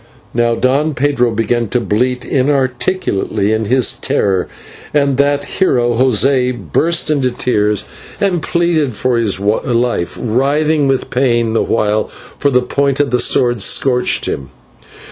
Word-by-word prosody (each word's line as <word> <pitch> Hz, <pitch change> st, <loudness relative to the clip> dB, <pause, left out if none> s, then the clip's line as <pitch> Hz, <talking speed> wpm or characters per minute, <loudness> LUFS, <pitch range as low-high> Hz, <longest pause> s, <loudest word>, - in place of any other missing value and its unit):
Now 120 Hz, 0 st, +1 dB
Don 140 Hz, +5 st, 0 dB
Pedro 130 Hz, -2 st, +1 dB
began 115 Hz, +1 st, -1 dB
to 125 Hz, -, +1 dB
bleat 125 Hz, +3 st, -1 dB
inarticulately 130 Hz, -, 0 dB
in 110 Hz, 0 st, 0 dB
his 125 Hz, +1 st, +2 dB
terror, 95 Hz, -3 st, -1 dB, 0.5 s
and 140 Hz, -2 st, +2 dB
that 145 Hz, 0 st, +1 dB
hero, 125 Hz, -9 st, +1 dB
José, 125 Hz, +1 st, +2 dB
burst 170 Hz, -1 st, +1 dB
into 135 Hz, -4 st, +1 dB
tears 105 Hz, -4 st, -1 dB, 0.3 s
and 190 Hz, -5 st, 0 dB
pleaded 160 Hz, -6 st, 0 dB
for 125 Hz, +3 st, 0 dB
his 105 Hz, -5 st, 0 dB
life, 110 Hz, -2 st, -1 dB
writhing 140 Hz, +5 st, +1 dB
with 135 Hz, -1 st, -1 dB
pain 120 Hz, -3 st, +1 dB
the 115 Hz, -, +1 dB
while, 105 Hz, -1 st, 0 dB, 0.3 s
for 145 Hz, -, +2 dB
the 125 Hz, -2 st, +2 dB
point 140 Hz, +2 st, -1 dB
of 145 Hz, -1 st, +1 dB
the 125 Hz, -, +1 dB
sword 120 Hz, -3 st, +2 dB
scorched 125 Hz, +4 st, +1 dB
him. 65 Hz, -2 st, -4 dB
125 Hz, 140 wpm, -15 LUFS, 115-140 Hz, 0.5 s, his